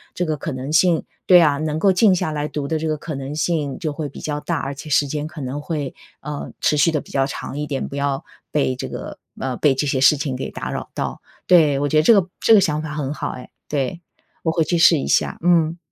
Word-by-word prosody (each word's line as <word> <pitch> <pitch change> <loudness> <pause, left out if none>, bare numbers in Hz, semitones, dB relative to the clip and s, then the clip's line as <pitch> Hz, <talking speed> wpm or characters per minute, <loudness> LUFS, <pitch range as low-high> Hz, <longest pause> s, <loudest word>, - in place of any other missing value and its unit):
这 180 - -1
个 155 -2 -1
可 155 - -4
能 130 +3 -5
性 170 -1 +4 0.2
对 180 -1 +8
啊， 150 -3 +3
能 155 0 -2
够 195 +3 +4
静 190 +1 +4
下 160 -3 -1
来 150 0 -2
读 145 -2 -4
的 160 +1 -1
这 160 - -2
个 155 - -1
可 155 +2 -6
能 135 +2 -5
性 150 -4 -1
就 155 - -2
会 150 0 -4
比 - - -11
较 150 -1 -3
大， 170 +2 -2
而 135 - -3
且 150 +2 -9
时 145 0 +3
间 150 +2 -3
可 155 -1 -9
能 135 +2 -4
会， 150 -4 -4 0.3
呃， 150 0 -6
持 - - +3
续 155 +3 +4
得 155 - 0
比 - - -15
较 135 -1 +2
长 135 0 -6
一 150 - -2
点， 140 -2 -3
不 - - -7
要 140 +1 -1 0.3
被 140 -3 +1
这 - - -5
个 - - -7 0.2
呃， 130 -1 -2
被 145 -3 +3
这 140 - 0
些 135 - 0
事 135 +3 +6
情 140 -2 -3
给 130 - -4
打 - - -5
扰 - - -5
到。 - - -4 0.3
对， 155 -6 +5
我 145 - 0
觉 155 - +2
得 155 - +5
这 230 - +7
个 180 - -3
这 225 - +5
个 215 - +8
想 155 -3 0
法 155 -1 -6
很 145 -2 -2
好 - - -4
哎， 125 - -10 0.2
对， 145 +3 -2 0.4
我 160 - +1
回 165 0 +1
去 170 +2 0
试 165 0 +6
一 140 - -3
下， - - +1
嗯。 170 -1 +3
150 Hz, 285 characters per minute, -21 LUFS, 140-160 Hz, 0.4 s, 对